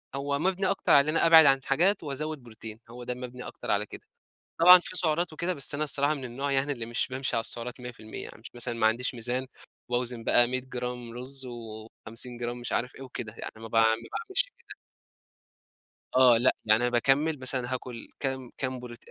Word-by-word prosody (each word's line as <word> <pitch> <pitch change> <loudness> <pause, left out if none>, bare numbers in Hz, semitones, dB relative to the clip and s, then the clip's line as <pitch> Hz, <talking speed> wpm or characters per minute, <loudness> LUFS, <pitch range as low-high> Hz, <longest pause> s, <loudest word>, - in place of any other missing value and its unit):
هو 140 +1 -2
مَبنِي 190 +3 0
أكتر 195 - 0
علي 140 +2 +6
إن 165 - +2
أنا - - +4
أبعد 160 -2 +9
عن 135 -1 +6
حاجات 180 +7 +2
وأزود 150 0 -4
بروتين، 110 -1 -9
هو 120 +1 -10
ده 125 - -3
مَبنِي 125 0 -8
أكتر - - -5
على 105 +1 +2
كده، - - -9 0.6
طبعًا 180 +2 +10
في 185 +1 -5
سُعرات 170 +1 +1
وكده، 170 +4 -2
بس 140 -1 -4
أنا 155 +1 0
الصّراحة 145 +1 +1
من 135 -3 -5
النوع 135 +3 -3
يعني 135 +2 +2
اللي 120 -4 -5
مش 120 0 -1
بامشي 130 -1 -2
على - - +2
السُّعرات 120 +2 -5
100% 120 -3 -8
يعني 110 - -11
مثلًا 120 0 -2
ما 110 -1 +2
عنديش 120 +4 0
ميزان 125 +2 -3 0.4
وباوزن 120 -1 -1
بقى 120 - +6
100 130 +1 -2
جرام 125 -2 -6
رز، 130 +2 -4
و50 115 +1 -6
جرام 120 0 -4
مش 120 - -5
عارف 125 +2 -1
إيه 135 - -11
وكده، 120 -3 -6
يعني - - -6
ما 115 0 -9
با 115 - +1
ما - - +5
باعملش 115 - 0 0.2
كده. 475 - -12 1.4
آه، 125 -3 +7
لأ، 125 +2 +3
يعني 110 +2 +4
أنا 125 - +2
باكمل 135 +5 +2
مثلًا 130 -1 +1
هاكُل 125 -2 -6
كام 130 -2 -3
كام 130 -1 -3
بروت 120 -1 -9
125 Hz, 205 wpm, -27 LUFS, 120-140 Hz, 1.4 s, طبعًا